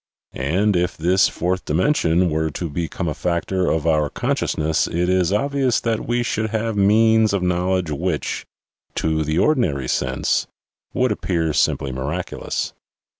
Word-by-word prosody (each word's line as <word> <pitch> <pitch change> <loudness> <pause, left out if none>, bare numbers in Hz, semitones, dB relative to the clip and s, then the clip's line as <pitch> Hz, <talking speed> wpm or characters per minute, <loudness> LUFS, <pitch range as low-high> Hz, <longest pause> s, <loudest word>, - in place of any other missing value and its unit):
and 90 +10 +1
if 90 0 0
this 90 +4 +3
fourth 90 +2 -2
dimension 90 - +2
were 80 +1 0
to 80 +1 -5
become 85 +3 -3
a 75 - -1
factor 90 +3 -1
of 80 -1 0
our 75 -3 +2
consciousness 80 +3 0
it 85 +1 -1
is 90 -1 +2
obvious 135 +3 +1
that 115 -2 -2
we 120 +1 +1
should 110 -2 -1
have 110 0 -2
means 110 +2 +4
of 100 -2 0
knowledge 90 -1 0
which, 80 +1 -2 0.5
to 80 -1 0
the 75 +2 -1
ordinary 90 - +1
sense, 65 +1 0 0.4
would 130 -2 +1
appear 85 -6 -1
simply 70 -2 +1
miraculous. 75 +8 -3
90 Hz, 145 wpm, -21 LUFS, 80-105 Hz, 0.5 s, means